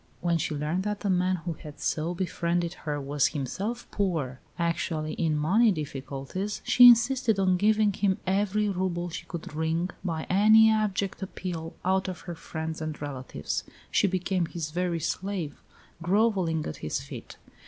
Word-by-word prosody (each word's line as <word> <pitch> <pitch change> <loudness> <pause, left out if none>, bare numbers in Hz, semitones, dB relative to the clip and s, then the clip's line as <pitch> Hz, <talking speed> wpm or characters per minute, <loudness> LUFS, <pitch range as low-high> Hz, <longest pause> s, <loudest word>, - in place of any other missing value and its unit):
When 170 -1 +1
she 150 - -1
learned 150 +5 -1
that 210 +1 -3
the 200 - +1
man 185 +1 +2
who 170 - -1
had 150 -1 -11
so 165 +3 -1
befriended 170 -1 -1
her 150 -4 -4
was 140 0 +1
himself 195 - -3
poor, 160 -11 -1 0.2
actually 165 -2 -1
in 160 -3 0
money 205 +10 +4
difficulties, 145 +5 -4
she 245 0 +8
insisted 240 -1 +5
on 190 -1 +3
giving 210 +2 +3
him 190 -1 +1
every 205 +2 +1
rouble 180 -2 -1
she - - -7
could 170 -3 -7
wring, 160 +3 -1
by 165 -4 -2
any 215 +3 +6
abject 205 -3 0
appeal, 175 -4 -5
out 190 +1 +2
of 185 -1 -5
her 175 - -6
friends 160 -1 -5
and 155 -1 -4
relatives. 130 - -4 0.3
She - - +3
became 185 -1 0
his 160 -2 -5
very 175 0 -1
slave, 185 -1 -3 0.4
grovelling 185 -4 +2
at 75 - -5
his 75 - -2
feet. - - -9
175 Hz, 160 wpm, -28 LUFS, 160-200 Hz, 0.4 s, she